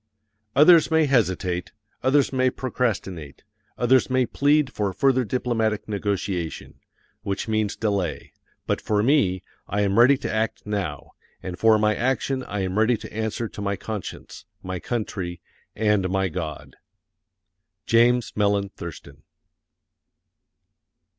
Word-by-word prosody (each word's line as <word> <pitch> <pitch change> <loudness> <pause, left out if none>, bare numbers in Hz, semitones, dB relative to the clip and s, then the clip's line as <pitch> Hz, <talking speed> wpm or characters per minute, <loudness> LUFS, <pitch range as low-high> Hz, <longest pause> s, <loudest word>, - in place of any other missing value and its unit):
Others 160 +2 +7
may 160 -1 +3
hesitate, 95 -8 0 0.3
others 135 +1 +2
may 130 0 +3
procrastinate, 105 - -3 0.3
others 125 +2 +3
may 130 0 +2
plead 145 +1 +2
for 100 -2 -1
further 130 +5 +2
diplomatic 115 -2 -1
negotiation, 100 -5 -3 0.4
which 100 0 -3
means 110 -2 0
delay; 100 -6 -2 0.3
but - - -1
for 105 -1 0
me, 115 - +2 0.2
I 100 +2 -1
am 100 +2 +2
ready 130 +3 +6
to - - -4
act 110 0 -2
now, 95 -9 -4 0.3
and 90 -1 -6
for 110 -1 +5
my 105 0 +2
action 130 +2 -1
I 105 - -3
am 95 +2 -1
ready 115 +2 +3
to - - -11
answer 110 +1 -2
to - - -9
my 100 0 -1
conscience, 105 0 -7 0.2
my 95 -1 -4
country, 95 -6 -4 0.4
and 105 -4 +1
my 95 0 0
God. 80 -3 -6 1.1
JAMES 120 +1 +3
MELLEN 100 -1 +1
THURSTON. 85 -4 -10
105 Hz, 125 wpm, -24 LUFS, 95-125 Hz, 1.1 s, Others